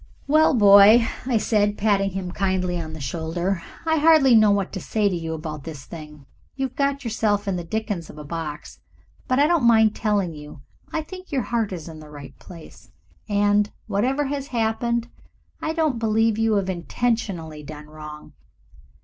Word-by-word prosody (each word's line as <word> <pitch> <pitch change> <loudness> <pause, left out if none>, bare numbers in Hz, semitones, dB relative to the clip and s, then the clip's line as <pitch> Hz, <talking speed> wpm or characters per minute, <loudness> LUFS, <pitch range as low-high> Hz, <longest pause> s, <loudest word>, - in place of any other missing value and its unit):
"Well, 310 +2 +4
my - - +1
boy," 205 +3 +7 0.2
I 245 -3 +2
said, 210 -1 +1
patting 200 -2 +2
him 185 -1 -5
kindly 185 -2 -1
on 155 -1 -7
the 160 - -8
shoulder, 170 +6 -2 0.2
"I 320 0 +2
hardly 305 -4 +5
know 215 -2 +6
what 200 -2 0
to 190 - -5
say 210 +3 0
to 190 - 0
you 165 -1 -4
about 155 -2 -6
this 150 -4 -8
thing. 150 -3 -11 0.3
You've 265 -2 -3
got 280 0 0
yourself 215 -3 0
in 195 - 0
the 175 - -4
dickens 200 -2 -4
of - - -12
a 150 - -8
box, 150 -1 -6 0.5
but 255 - +1
I 285 - +5
don't 335 -3 +2
mind 220 -2 +5
telling 205 -6 0
you 150 -2 -11 0.3
I 315 - -2
think 370 +3 -11
your 270 -4 0
heart 225 -1 -1
is 175 -4 -6
in 160 -1 -9
the 155 -1 -12
right 140 -2 -11
place, 170 -3 -14 0.4
and, 205 0 +2
whatever 260 +8 0
has 275 0 -3
happened, 235 0 -1 0.5
I 315 - -1
don't 315 -7 0
believe 225 0 +1
you 225 -1 +2
have 195 -2 0
intentionally 185 -4 -2
done 150 0 -10
wrong. 150 0 -11
205 Hz, 185 wpm, -23 LUFS, 165-235 Hz, 0.5 s, boy